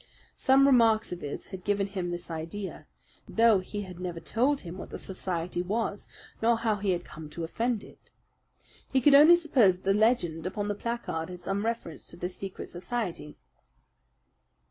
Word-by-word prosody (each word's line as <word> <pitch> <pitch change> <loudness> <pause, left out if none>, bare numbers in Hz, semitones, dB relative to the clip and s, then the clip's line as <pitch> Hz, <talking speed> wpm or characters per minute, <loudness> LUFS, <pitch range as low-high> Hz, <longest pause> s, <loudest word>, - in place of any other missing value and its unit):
Some 270 +1 +5
remarks 230 -5 +4
of 180 - -5
his 145 - -5
had 185 -1 -6
given 205 0 +1
him 190 -3 -4
this 175 0 -5
idea; 165 +5 -6 0.4
though 225 -3 +4
he 205 +3 -5
had 180 -2 -10
never 175 -2 -4
told 260 +10 +1
him 180 +1 -8
what - - -8
the - - -6
society 180 -2 -3
was, 205 +2 -2 0.3
nor 230 +1 +4
how 225 -2 0
he 200 0 -2
had 175 -1 0
come 155 -1 -10
to 165 +2 -6
offend 225 +6 -1
it. - - -17 0.8
He 265 - +4
could 285 +3 +5
only 300 +5 +9
suppose 265 - +4
that - - -24
the 195 - +3
legend 190 -7 +2
upon 205 +2 -3
the - - +1
placard 205 -7 -4
had 180 -1 -8
some 200 +3 -2
reference 230 -9 -4
to - - -10
this 180 +1 -5
secret 195 -1 -7
society. 175 -5 -4
195 Hz, 180 wpm, -28 LUFS, 175-230 Hz, 0.8 s, only